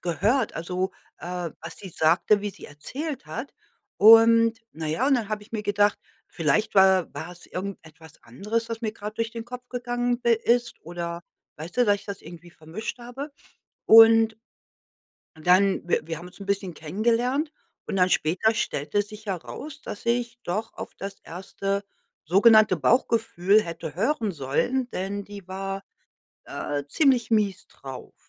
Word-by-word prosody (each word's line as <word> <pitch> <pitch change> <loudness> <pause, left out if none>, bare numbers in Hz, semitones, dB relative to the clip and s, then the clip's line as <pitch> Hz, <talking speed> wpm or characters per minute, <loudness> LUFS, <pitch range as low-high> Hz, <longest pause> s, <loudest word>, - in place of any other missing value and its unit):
gehört. 210 - 0
Also, 180 +3 -2 0.3
äh, 175 -1 -4
was 165 0 -8
sie 195 - -9
sagte, 170 +6 +3
wie 205 0 -3
sie - - -14
erzählt 265 - -6
hat. 230 - -6 0.4
Und, 225 +1 +7
na 160 0 -5
ja, 160 - 0
und 280 - +4
dann 225 -4 -1
habe 210 -1 -3
ich 210 - -19
mir 215 -2 -2
gedacht: 205 0 +2 0.3
„Vielleicht 170 +8 0
wa 190 -2 +5
war 175 - -7
es 175 - -16
irgendetwas 160 -5 -8
anderes, 210 - -3
was 230 -1 -5
mir 220 -2 -2
gerade 210 -1 -7
durch 230 0 -1
den 230 -1 -7
Kopf 250 +1 -9
gegangen 245 0 -2
i 235 - +6
ist“, 235 +1 +1
oder 170 0 -5 0.3
weißt 160 +3 -9
du, 250 - +4
dass 205 -2 +3
ich 200 - -15
das 200 -1 -7
irgendwie 175 +1 -12
vermischt 170 +9 -7
habe? 245 +5 -7 0.6
Und 225 0 +8 1.0
dann 180 +4 +3
w - - +2
wir 165 -1 -5
haben 175 - -10
uns 180 - -15
'n 200 - -8
bisschen 195 -3 -2
kennengelernt 235 - 0 0.3
und 205 - -3
dann 185 -1 +3
später 185 +9 +2
stellte 180 -3 -1
sich 210 +1 -12
heraus, 260 - -6
dass 205 - -8
ich 235 0 0
doch 210 +6 -3
auf - - -8
das 195 0 -7
1. 195 +3 -4 0.4
sogenannte 210 +3 +6
Bauchgefühl 215 - +2
hätte 165 -4 -7
hören 220 - 0
sollen, 170 - -1
denn 200 +2 -4
die 200 -2 -11
war, 195 +1 -4 0.6
äh, 145 -1 -4
ziemlich 255 - +2
mies 205 -4 +1
drauf, 135 -2 -10
205 Hz, 160 wpm, -25 LUFS, 175-230 Hz, 1.0 s, Und